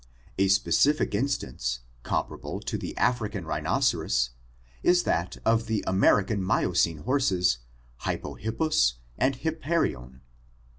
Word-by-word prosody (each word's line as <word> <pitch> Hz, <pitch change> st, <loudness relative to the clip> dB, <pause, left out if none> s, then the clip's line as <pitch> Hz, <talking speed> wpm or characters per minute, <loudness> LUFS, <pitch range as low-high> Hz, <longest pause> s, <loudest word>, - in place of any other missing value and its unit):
A 95 Hz, -, +4 dB
specific 105 Hz, +10 st, +3 dB
instance, 65 Hz, -, -2 dB, 0.2 s
comparable -, -, -3 dB
to -, -, -4 dB
the -, -, -5 dB
African 110 Hz, -7 st, 0 dB
rhinoceros, 75 Hz, -, +1 dB, 0.5 s
is 175 Hz, 0 st, +4 dB
that 90 Hz, +2 st, -1 dB
of 115 Hz, 0 st, +2 dB
the 110 Hz, -1 st, -1 dB
American 100 Hz, +2 st, +3 dB
Miocene 85 Hz, -4 st, +1 dB
horses 95 Hz, -, +2 dB, 0.5 s
Hypohippus 110 Hz, -, 0 dB, 0.3 s
and 135 Hz, +1 st, +2 dB
Hip 160 Hz, +4 st, -3 dB
Parian. 65 Hz, -, -1 dB
100 Hz, 105 wpm, -27 LUFS, 80-130 Hz, 0.5 s, A